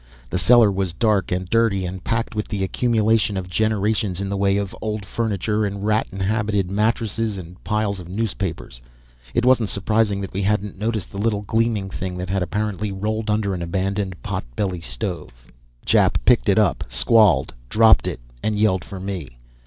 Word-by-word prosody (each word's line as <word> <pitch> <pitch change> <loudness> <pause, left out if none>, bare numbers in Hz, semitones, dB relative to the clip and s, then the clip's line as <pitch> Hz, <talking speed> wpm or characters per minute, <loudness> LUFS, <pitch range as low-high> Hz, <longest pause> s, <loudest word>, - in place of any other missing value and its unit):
The 90 - 0
cellar 115 +3 +6
was 95 -3 -2
dark 105 -5 +1
and 90 0 -1
dirty, 110 -3 +2
and 90 +1 -6
packed 115 +1 -1
with 105 -1 -3
the 100 -2 -2
accumulation 110 -1 +1
of 95 -1 -4
generations 105 -1 0
in 100 0 -3
the 100 - -2
way 100 0 +2
of 100 -1 -3
old 105 -2 -3
furniture 105 -1 -1
and 100 0 -3
rat 110 +1 +2
inhabited 100 0 -1
mattresses 110 0 0
and 90 0 -10
piles 105 -2 -1
of 90 -1 -10
newspapers; 95 - -4 0.5
it 120 - +2
wasn't 120 -5 +4
surprising 105 0 +1
that 95 - -6
we 95 - -2
hadn't 100 0 -1
noticed 110 -3 -2
the 100 - -6
little 105 -1 0
gleaming 110 -2 0
thing 90 -1 -4
that 90 +1 -4
had 95 -1 0
apparently 105 +2 -2
rolled 110 +3 -2
under 105 -2 +1
an 90 - -4
abandoned 95 +2 -2
potbelly 90 +9 -3
stove. - - -6 0.3
Jap - - +3
picked - - +4
it - - +4
up, - - +2
squalled, 85 - +4 0.2
dropped 110 - +5
it - - -3 0.2
and 110 -1 -1
yelled 105 -4 +2
for 95 - -8
me. 90 -10 -6
100 Hz, 175 wpm, -22 LUFS, 95-110 Hz, 0.5 s, cellar